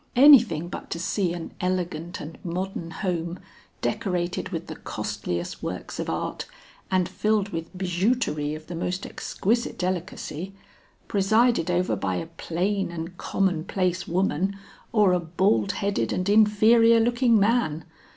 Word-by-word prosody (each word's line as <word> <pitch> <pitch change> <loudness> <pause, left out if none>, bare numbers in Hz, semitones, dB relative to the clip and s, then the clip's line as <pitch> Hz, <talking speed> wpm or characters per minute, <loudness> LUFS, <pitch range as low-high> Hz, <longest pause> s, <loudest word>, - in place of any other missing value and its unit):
Anything 240 - +7
but - - -7
to 170 - -3
see 185 0 0
an 170 -1 -6
elegant 175 -2 -2
and 155 +2 -9
modern 180 -1 -4
home, 170 -1 -3 0.5
decorated 180 -2 -1
with - - -4
the - - -7
costliest 85 0 -4
works - - -5
of - - -2
art, - - -3 0.4
and 185 -1 +2
filled 210 -2 0
with 165 -3 -5
bijouterie 180 -5 0
of 155 0 -10
the 175 - -7
most 180 +3 -3
exquisite 235 +4 -1
delicacy, 185 0 -4 0.5
presided 215 -2 +3
over 180 +1 +1
by 95 -2 -2
a 85 -2 -3
plain 190 +4 -2
and 170 +1 -6
common 180 -5 0
place 185 -1 -1
woman 190 +2 0 0.3
or 210 -5 +4
a 180 - +3
bald 165 - +1
headed 195 - -1
and 185 +2 -1
inferior 220 +2 +6
looking 240 0 +3
man. 200 -7 +1
185 Hz, 140 wpm, -25 LUFS, 170-205 Hz, 0.5 s, Anything